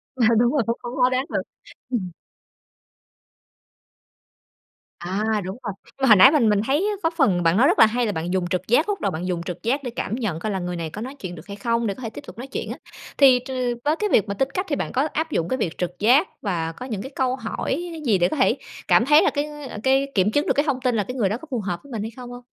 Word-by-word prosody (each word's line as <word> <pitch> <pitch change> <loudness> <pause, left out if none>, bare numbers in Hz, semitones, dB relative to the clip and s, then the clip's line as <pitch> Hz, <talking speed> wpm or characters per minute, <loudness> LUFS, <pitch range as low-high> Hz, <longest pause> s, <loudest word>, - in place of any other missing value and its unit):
Ờ, 250 -3 +2
đúng 240 +1 +3
rồi, 280 -4 +1
khó 230 - +2
khó 240 - -4
khó 250 -1 +4
đoán 255 +1 0
được. - - -1 0.5
Ừm. 205 -8 -2 2.9
À, 205 +5 -1
đúng 190 +4 -6
rồi! 205 -4 -3
Nhưng - - -21
mà 270 - +3
hồi 215 - +9
nãy 255 +8 +8
mình 260 -8 +3
mình 205 -1 +3
thấy 275 +2 +3
á 420 - 0
có 325 - +3
phần 255 - +2
bạn 165 +3 +3
nói 255 +5 +5
rất - - +2
là - - +10
hay, 240 +3 0
là 215 - 0
bạn 170 0 -3
dùng 185 -2 0
trực 180 +1 -2
giác 295 - +3
lúc 410 - -2
đầu 200 - 0
bạn 175 +2 -4
dùng 175 -2 -2
trực 180 -1 -7
giác 270 +6 0
để 250 - -3
cảm 220 - -2
nhận 215 -10 -2
coi 215 +5 -3
là 190 - -2
người 180 0 -4
này 165 -2 -4
có 210 - -7
nói 260 +4 -6
chuyện 175 -2 -6
được 155 - -12
hay 200 - -7
không, 230 +2 0
để 200 - -1
có 255 - -13
thể 230 - -4
tiếp - - -9
tục 200 - -11
nói 250 +3 -7
chuyện 270 - -5
á, - - -6 0.4
thì 265 -3 +7
t 245 - -13 0.4
với 300 +2 +3
cái 420 +5 -1
việc 215 - +3
mà 200 - -2
tính 265 +7 0
cách 370 - -1
thì 290 - +1
bạn - - -3
có 265 +4 +1
áp 320 0 -2
dụng 165 -8 -1
cái 260 - 0
việc 175 -9 -3
trực 180 0 -4
giác 255 - +4
và 165 -5 -2
có 205 +10 -9
những 220 -7 -4
cái 265 - -8
câu 255 -1 +1
hỏi 270 +7 -3
gì 215 -6 +3
để 175 -1 +3
có 310 - -3
thể 260 - +3 0.3
cảm 230 - +5
thấy 295 +3 +6
là - - +4
cái 290 0 -1 0.4
cái 270 +1 +2
kiểm 195 +1 +3
chứng 290 +4 +1
được - - +3
cái 285 - +1
thông 265 -4 -1
tin 250 -2 +1
là 210 - +1
cái 250 - -7
người 215 -7 +1
đó 210 - -1
có 320 - -11
phù 250 - -1
hợp 180 -4 -3
với 280 - -15
mình 225 -3 -3
hay 220 +2 -4
không 245 -1 -9
hông? 245 0 -10
230 Hz, 290 wpm, -23 LUFS, 190-265 Hz, 2.9 s, là